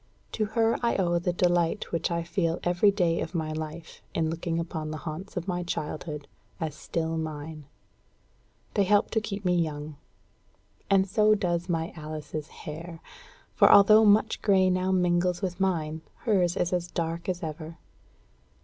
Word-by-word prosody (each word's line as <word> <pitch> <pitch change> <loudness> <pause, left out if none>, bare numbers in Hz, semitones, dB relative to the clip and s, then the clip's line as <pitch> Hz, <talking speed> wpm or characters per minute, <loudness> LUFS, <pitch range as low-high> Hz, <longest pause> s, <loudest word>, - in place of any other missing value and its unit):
To 215 - 0
her 225 0 +3
I 235 - +1
owe 175 -3 +1
the 180 +1 0
delight 175 +2 +1
which 165 -1 0
I 170 -1 -1
feel 170 0 -1
every 175 +4 +4
day 175 -4 +1
of - - -5
my 160 -2 -1
life 155 +1 -7
in 160 -1 +1
looking 165 0 -2
upon 160 -2 -4
the 155 - -4
haunts 175 +5 -6
of 175 +1 -3
my 180 -1 -1
childhood 150 -3 -4 0.3
as 160 -2 -3
still 160 +1 -3
mine. 155 -1 -6 1.1
They 205 - +3
help 205 +1 +4
me - - -26
to 220 - +1
keep 205 -1 -5
young. 155 -4 -1 0.9
And 195 -1 +4
so 215 +1 +4
does 175 -2 -1
my 165 0 -1
Alice's 155 -1 -6
hair; 165 +3 -8 0.5
for - - +6
although 215 +2 +8
much 215 +1 +4
grey 190 -3 +4
now 185 +1 0
mingles 180 0 +1
with 180 -1 -2
mine, 160 -5 -1 0.2
hers 185 -6 +2
is 175 0 0
as 175 -1 0
dark 170 +1 -3
as 180 -1 -2
ever. 160 +1 -6
175 Hz, 165 wpm, -27 LUFS, 160-190 Hz, 1.1 s, although